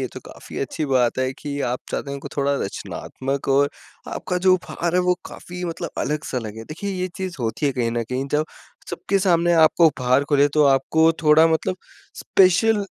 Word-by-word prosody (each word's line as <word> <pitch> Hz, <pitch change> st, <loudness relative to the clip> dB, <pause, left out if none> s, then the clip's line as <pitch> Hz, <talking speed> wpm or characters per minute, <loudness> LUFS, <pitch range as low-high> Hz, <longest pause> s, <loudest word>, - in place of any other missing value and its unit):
ये -, -, -1 dB
तो -, -, -8 dB
काफ़ी -, -, -10 dB
अच्छी 140 Hz, +3 st, -3 dB
बात 130 Hz, -2 st, +1 dB
है 130 Hz, 0 st, 0 dB
कि 145 Hz, +1 st, -6 dB
आप 125 Hz, -, -2 dB
चाहते 140 Hz, -, -3 dB
हैं -, -, -4 dB
उनको 140 Hz, -, -7 dB
थोड़ा 140 Hz, 0 st, +1 dB
रचनात्मक 135 Hz, +7 st, -5 dB
और 140 Hz, +1 st, +4 dB, 0.5 s
आपका 180 Hz, -, -2 dB
जो 185 Hz, -, +7 dB
उपहार 175 Hz, -1 st, -3 dB
है 180 Hz, -, +4 dB
वो 180 Hz, 0 st, +2 dB
काफ़ी 180 Hz, 0 st, -8 dB
मतलब 170 Hz, -2 st, -4 dB
अलग-सा 150 Hz, -1 st, -2 dB
लगे। 110 Hz, -1 st, -7 dB
देखिए 170 Hz, -, -5 dB
ये 185 Hz, -1 st, -2 dB
चीज़ 185 Hz, -3 st, -5 dB
होती 120 Hz, +6 st, -1 dB
है 140 Hz, -, +1 dB
कहीं 120 Hz, -3 st, -1 dB
न 120 Hz, 0 st, -1 dB
कहीं 130 Hz, +2 st, -2 dB
जब 150 Hz, +1 st, +2 dB, 0.5 s
सबके 195 Hz, +3 st, -1 dB
सामने 175 Hz, -2 st, +2 dB
आपको 165 Hz, +2 st, +5 dB
उपहार 130 Hz, -1 st, +2 dB
खुले 145 Hz, -1 st, +4 dB
तो 150 Hz, -, +5 dB
आपको 160 Hz, +4 st, +3 dB
थोड़ा 155 Hz, +1 st, +6 dB
मतलब 165 Hz, +3 st, 0 dB, 0.4 s
स्पेशल 200 Hz, +3 st, +3 dB
150 Hz, 195 wpm, -22 LUFS, 135-175 Hz, 0.5 s, जो